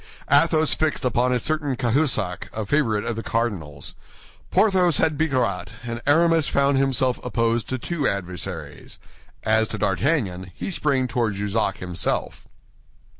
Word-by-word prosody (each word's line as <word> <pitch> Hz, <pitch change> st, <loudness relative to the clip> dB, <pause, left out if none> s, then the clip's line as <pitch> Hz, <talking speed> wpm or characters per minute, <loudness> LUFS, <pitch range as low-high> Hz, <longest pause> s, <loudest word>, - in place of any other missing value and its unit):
Athos 155 Hz, +1 st, +4 dB
fixed 155 Hz, -4 st, -1 dB
upon 125 Hz, 0 st, +2 dB
a 125 Hz, -, +3 dB
certain 145 Hz, 0 st, -1 dB
Cahusac, 120 Hz, -, 0 dB
a 110 Hz, -1 st, -3 dB
favorite 115 Hz, -5 st, +1 dB
of 115 Hz, -, -2 dB
the 115 Hz, -, -4 dB
cardinal's. 90 Hz, -, -3 dB, 0.6 s
Porthos 185 Hz, -6 st, +3 dB
had 160 Hz, -2 st, +2 dB
Bicarat, 130 Hz, -, -1 dB
and 120 Hz, 0 st, -5 dB
Aramis 165 Hz, +1 st, +4 dB
found 140 Hz, -1 st, +2 dB
himself 130 Hz, -2 st, +1 dB
opposed 115 Hz, -1 st, 0 dB
to 130 Hz, -, -1 dB
two 150 Hz, +3 st, -2 dB
adversaries. 90 Hz, -3 st, -5 dB, 0.5 s
As 110 Hz, 0 st, +2 dB
to 105 Hz, -, -4 dB
D'Artagnan, 95 Hz, -, 0 dB
he -, -, -4 dB
sprang 140 Hz, -6 st, +1 dB
toward 115 Hz, -4 st, -1 dB
Jussac 100 Hz, 0 st, -1 dB
himself. 90 Hz, -1 st, -3 dB
125 Hz, 135 wpm, -23 LUFS, 105-145 Hz, 0.6 s, Athos